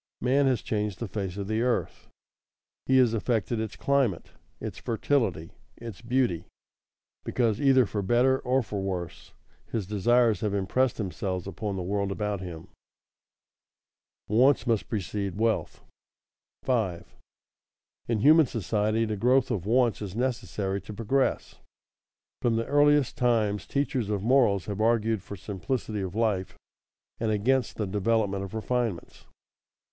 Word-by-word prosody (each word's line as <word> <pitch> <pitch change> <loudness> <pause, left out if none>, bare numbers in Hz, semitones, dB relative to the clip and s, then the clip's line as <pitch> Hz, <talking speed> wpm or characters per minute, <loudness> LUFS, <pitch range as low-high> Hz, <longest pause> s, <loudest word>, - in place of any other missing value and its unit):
Man 135 +3 +2
has 125 -4 +1
changed 105 -3 -2
the 115 - -4
face 95 -1 -4
of 100 -1 -4
the 110 +1 0
earth; 125 0 -1 0.8
he 130 - +4
has 125 -3 +4
affected 115 0 0
its 110 -1 -4
climate, 135 -10 0 0.3
its - - -6
fertility, 110 - -1 0.3
its 115 -4 -9
beauty, 120 -7 0 0.8
because, 115 -3 0
either 135 -3 +5
for 105 0 -3
better 125 +6 +3
or 130 +1 +1
for 100 -2 -4
worse, 90 -3 -5 0.3
his 110 -4 -3
desires 110 +2 +2
have 105 -2 -1
impressed 120 +6 +1
themselves 95 -3 -3
upon 100 +1 -4
the 95 - -3
world 100 +1 -1
about 105 0 -2
him. 85 -3 -8 1.6
[Sidenote: 110 +2 +1
Wants 135 +2 +4
must 115 -4 0
precede 100 -2 -3
wealth] 115 0 -1 0.8
5. 110 -10 -1 0.9
In 115 -3 0
human 155 +3 +6
society 110 +1 0
the 110 -1 -2
growth 125 +5 +2
of 100 -5 -2
wants 120 -1 +2
is 100 -2 -6
necessary 105 -5 -2
to 105 +3 -9
progress. 115 +6 -1 0.8
From 120 -2 +2
the 115 0 0
earliest 145 -2 +3
times 110 -5 +1
teachers 135 -6 -1
of 100 -2 -1
morals 115 -7 +3
have 105 0 -4
argued 115 -2 +2
for 100 - -8
simplicity 105 +3 -4
of 95 0 -5
life 105 -5 -1 0.6
and 115 - 0
against 120 +4 +1
the 105 - -2
development 100 0 0
of 100 +3 -7
refinements. 115 -4 -3
110 Hz, 140 wpm, -27 LUFS, 100-125 Hz, 1.6 s, human